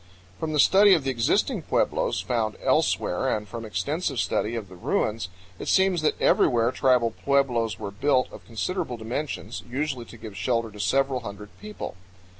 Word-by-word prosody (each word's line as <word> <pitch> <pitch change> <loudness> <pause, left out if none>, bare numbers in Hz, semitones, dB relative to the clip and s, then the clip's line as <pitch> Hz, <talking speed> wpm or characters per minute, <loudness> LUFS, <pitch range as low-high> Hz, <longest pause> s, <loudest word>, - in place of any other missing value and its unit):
From 160 - -2
the 150 - 0
study 195 +4 +7
of 160 - -1
the 135 - 0
existing 120 -3 +1
pueblos - - 0
found 110 -4 -1
elsewhere - - +1
and 105 -1 -2
from 115 +3 -7
extensive 120 - -2
study 110 +3 0
of 110 -4 -4
the 90 - -13
ruins, 105 +2 -1 0.3
it - - -6
seems 190 -3 +3
that 155 - 0
everywhere 120 -1 +3
tribal 125 -3 +3
pueblos 120 -7 +1
were 100 -2 -5
built 130 +4 +2
of - - -11
considerable 125 - -3
dimensions, 120 +7 -4
usually 135 -1 -2
to 120 - -13
give 110 -2 -9
shelter 115 +2 -1
to 105 - -12
several 135 +3 +1
hundred 105 -2 -8
people. 210 0 -7
120 Hz, 170 wpm, -25 LUFS, 110-140 Hz, 0.3 s, study